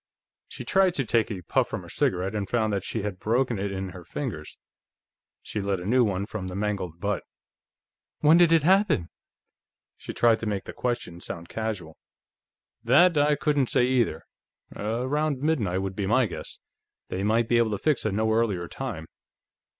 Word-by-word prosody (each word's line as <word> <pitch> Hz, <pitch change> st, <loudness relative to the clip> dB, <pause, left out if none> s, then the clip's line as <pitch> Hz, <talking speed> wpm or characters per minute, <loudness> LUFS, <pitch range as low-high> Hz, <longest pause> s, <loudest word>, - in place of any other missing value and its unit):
She -, -, -8 dB
tried 190 Hz, -2 st, +3 dB
to 135 Hz, -, 0 dB
take 115 Hz, 0 st, +1 dB
a 95 Hz, -4 st, -5 dB
puff -, -, +1 dB
from -, -, -4 dB
her -, -, -12 dB
cigarette 95 Hz, +3 st, 0 dB
and 100 Hz, -3 st, -3 dB
found 110 Hz, -3 st, +1 dB
that 100 Hz, -2 st, -1 dB
she 110 Hz, 0 st, -3 dB
had 100 Hz, -3 st, -4 dB
broken 120 Hz, 0 st, 0 dB
it 100 Hz, 0 st, -2 dB
in 95 Hz, -1 st, -4 dB
her 90 Hz, -1 st, -10 dB
fingers. 90 Hz, -, -6 dB, 0.9 s
She 105 Hz, -, -4 dB
lit 100 Hz, -1 st, -1 dB
a 90 Hz, -, -7 dB
new 125 Hz, +5 st, +4 dB
one 100 Hz, -3 st, -1 dB
from 105 Hz, -3 st, -5 dB
the 90 Hz, -, -6 dB
mangled 100 Hz, -5 st, -3 dB
butt. 105 Hz, +2 st, -1 dB, 1.0 s
"When 155 Hz, +2 st, +6 dB
did 175 Hz, -2 st, +5 dB
it 165 Hz, -3 st, +5 dB
happen?" 185 Hz, -, +3 dB, 0.9 s
She -, -, -7 dB
tried 115 Hz, -1 st, +3 dB
to 115 Hz, -, -4 dB
make 100 Hz, -2 st, -2 dB
the -, -, -8 dB
question 120 Hz, -8 st, -3 dB
sound 85 Hz, 0 st, -7 dB
casual. 105 Hz, -8 st, -4 dB, 0.8 s
"That 155 Hz, +9 st, +5 dB
I 145 Hz, 0 st, +4 dB
couldn't 145 Hz, -2 st, +1 dB
say, 125 Hz, -, +3 dB
either. 120 Hz, -11 st, +1 dB, 0.5 s
Around 130 Hz, +7 st, -1 dB
midnight, 110 Hz, -, 0 dB
would 95 Hz, -1 st, -4 dB
be 100 Hz, -1 st, -2 dB
my 125 Hz, +4 st, +4 dB
guess. 100 Hz, -, -7 dB, 0.5 s
They 95 Hz, -, -3 dB
might 110 Hz, +3 st, +2 dB
be 120 Hz, 0 st, +3 dB
able 115 Hz, -1 st, +3 dB
to 105 Hz, -, -1 dB
fix 150 Hz, +5 st, +1 dB
a 110 Hz, -, 0 dB
no 110 Hz, +2 st, +1 dB
earlier 105 Hz, -7 st, 0 dB
time." 110 Hz, -11 st, -5 dB
110 Hz, 185 wpm, -26 LUFS, 95-130 Hz, 1.0 s, When